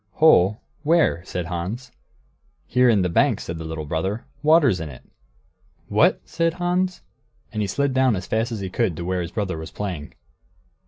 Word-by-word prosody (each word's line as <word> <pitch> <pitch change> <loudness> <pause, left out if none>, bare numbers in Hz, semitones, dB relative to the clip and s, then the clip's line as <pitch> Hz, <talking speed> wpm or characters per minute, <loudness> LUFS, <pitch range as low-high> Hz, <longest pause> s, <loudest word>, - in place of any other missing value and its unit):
"Hole? 110 - +5 0.2
Where?" 155 - +2
said 90 -1 -4
Hans. 90 +9 -5 0.7
"Here 125 0 +3
in 105 -5 +4
the - - +2
bank," 85 - +2
said 85 -1 -6
the - - -5
little 80 -1 -5
brother; 95 +9 -2 0.2
"water's 150 - +4
in 80 -2 -5
it." 65 - -12 0.9
"What!" - - +3
said 165 0 0
Hans, 180 - -1 0.5
and 105 - -1
he 105 - 0
slid 140 +7 0
down 130 -3 +3
as 95 0 -4
fast 110 +2 -1
as 110 -3 -4
he 95 - -4
could 95 -9 0
to 85 - -4
where 90 0 -1
his 85 - -4
brother 95 -4 -3
was 80 - -7
playing. 90 -8 -5
100 Hz, 180 wpm, -23 LUFS, 85-130 Hz, 0.9 s, Hole